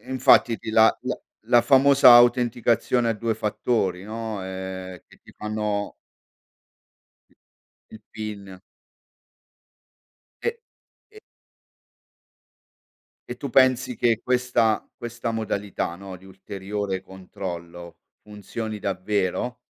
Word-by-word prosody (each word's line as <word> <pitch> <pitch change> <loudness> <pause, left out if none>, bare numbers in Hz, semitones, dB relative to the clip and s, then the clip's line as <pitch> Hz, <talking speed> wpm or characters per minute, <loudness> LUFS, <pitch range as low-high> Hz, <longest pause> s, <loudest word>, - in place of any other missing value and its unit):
e - - -8
infatti 125 -2 +4
ti - - -6
la 110 0 +5
la - - -3 0.3
la 120 0 +5
famosa 135 0 +6
autenticazione 120 0 +3
a - - +2
2 115 +1 -2
fattori, 105 -3 -1
no, 110 -2 -5
ehm 95 -1 -7
che - - -20
ti - - -17
fanno 105 -1 -3 1.8
i - - -21
il 110 - -11
PIN. 100 -4 -8 1.8
E 470 - +2 0.6
e 430 - -15 2.1
e - - -6
tu 140 - -6
pensi 130 -1 +3
che 115 0 +1
questa 125 -3 +1
questa 120 0 -5
modalità, 105 -5 -3
no, 95 0 -9
di 90 - -19
ulteriore 95 0 -5
controllo, 90 -3 -9 0.2
funzioni 105 +1 -6
davvero? 100 +5 -2
110 Hz, 105 wpm, -24 LUFS, 95-120 Hz, 2.1 s, famosa